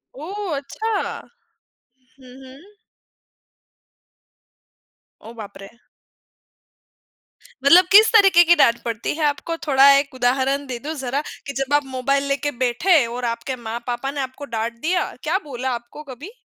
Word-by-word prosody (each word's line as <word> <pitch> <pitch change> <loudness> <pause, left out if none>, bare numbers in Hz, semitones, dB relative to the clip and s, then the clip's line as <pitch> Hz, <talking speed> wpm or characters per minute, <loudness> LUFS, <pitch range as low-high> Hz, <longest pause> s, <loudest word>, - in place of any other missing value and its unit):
ओह, 365 +4 -5
अच्छा! 435 +11 -4 1.3
हुँ, 255 -1 -15
हुँ। 280 +11 -16 2.5
ओह, 225 - -12
बाप 205 - -10
रे! 195 - -10 2.0
मतलब 350 +6 +7
किस 430 +3 +7
तरीके 390 -5 +6
की 345 0 +5
डाँट 235 -7 +3
पड़ती 230 -2 -3
है 315 - -3
आपको? 295 +3 -2
थोड़ा 275 -1 +6
एक 280 0 -2
उदाहरण 265 +3 0
दे 250 -2 -5
दो 300 +5 -6
ज़रा, 270 -1 -3 0.3
कि 280 - -5
जब 270 +1 -3
आप 290 -1 +2
मोबाइल 270 +1 -1
लेके 280 +1 -1
बैठे 270 +4 +2
और 240 +1 -5
आपके 235 +3 -3
माँ-पापा 240 +2 -5
ने 285 0 -4
आपको 265 +2 -7
डाँट 225 +1 -2
दिया, 355 +3 -1
क्या - - 0
बोला 260 -2 -4
आपको 240 +5 -10
कभी? 300 - -11
275 Hz, 140 wpm, -21 LUFS, 245-310 Hz, 2.5 s, मतलब